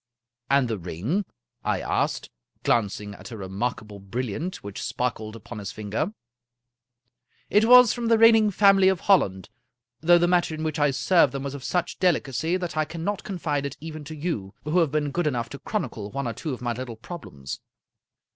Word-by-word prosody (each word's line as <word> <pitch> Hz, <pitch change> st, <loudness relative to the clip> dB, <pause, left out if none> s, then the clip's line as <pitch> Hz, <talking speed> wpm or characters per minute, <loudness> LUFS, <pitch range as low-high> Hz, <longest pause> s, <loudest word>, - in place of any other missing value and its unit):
" 120 Hz, 0 st, -65 dB
And 140 Hz, -2 st, +4 dB
the 110 Hz, -3 st, -3 dB
ring? 100 Hz, -, -2 dB, 0.2 s
" -, -, -53 dB
I -, -, -2 dB
asked, -, -, -1 dB, 0.3 s
glancing 105 Hz, -2 st, 0 dB
at 100 Hz, -, -11 dB
a 115 Hz, -, -7 dB
remarkable 105 Hz, +2 st, -4 dB
bril 115 Hz, +6 st, -4 dB
liant 170 Hz, -, -4 dB
which 100 Hz, -1 st, -6 dB
sparkled 110 Hz, -3 st, -3 dB
upon 110 Hz, 0 st, -9 dB
his 100 Hz, -1 st, -5 dB
finger. 110 Hz, -, -3 dB, 0.7 s
" 125 Hz, 0 st, -44 dB
It 210 Hz, +2 st, +5 dB
was 250 Hz, -1 st, +8 dB
from 240 Hz, -1 st, -3 dB
the 230 Hz, 0 st, +5 dB
reigning 225 Hz, -1 st, +6 dB
family 195 Hz, -1 st, +5 dB
of 190 Hz, -3 st, +2 dB
Holland, 95 Hz, -, +2 dB, 0.5 s
though 175 Hz, +2 st, +6 dB
the 175 Hz, 0 st, +3 dB
matter 175 Hz, -2 st, +2 dB
in 155 Hz, -, -5 dB
which 155 Hz, 0 st, -2 dB
I 145 Hz, 0 st, +4 dB
served 140 Hz, +2 st, +3 dB
them 135 Hz, -1 st, -4 dB
was 140 Hz, -1 st, -4 dB
of 140 Hz, -2 st, -7 dB
such 180 Hz, +4 st, -1 dB
delicacy 165 Hz, -1 st, +1 dB
that 175 Hz, -3 st, -4 dB
I 155 Hz, -, +2 dB
cannot 170 Hz, +6 st, -4 dB
confide 160 Hz, -7 st, -2 dB
it 140 Hz, -2 st, -5 dB
even 155 Hz, -1 st, -7 dB
to 155 Hz, +2 st, -7 dB
you, 145 Hz, -, -4 dB
who 155 Hz, +4 st, +2 dB
have 165 Hz, -5 st, +2 dB
been 150 Hz, -1 st, 0 dB
good 175 Hz, +1 st, 0 dB
enough 120 Hz, -5 st, -1 dB
to 140 Hz, -, -8 dB
chronicle 115 Hz, -, -4 dB
one 140 Hz, +2 st, -3 dB
or 115 Hz, -, -2 dB
two 155 Hz, +7 st, -5 dB
of 125 Hz, -, -5 dB
tny 120 Hz, -1 st, -1 dB
little 125 Hz, -1 st, -6 dB
problems." 110 Hz, -, -8 dB
140 Hz, 200 wpm, -25 LUFS, 115-175 Hz, 0.7 s, was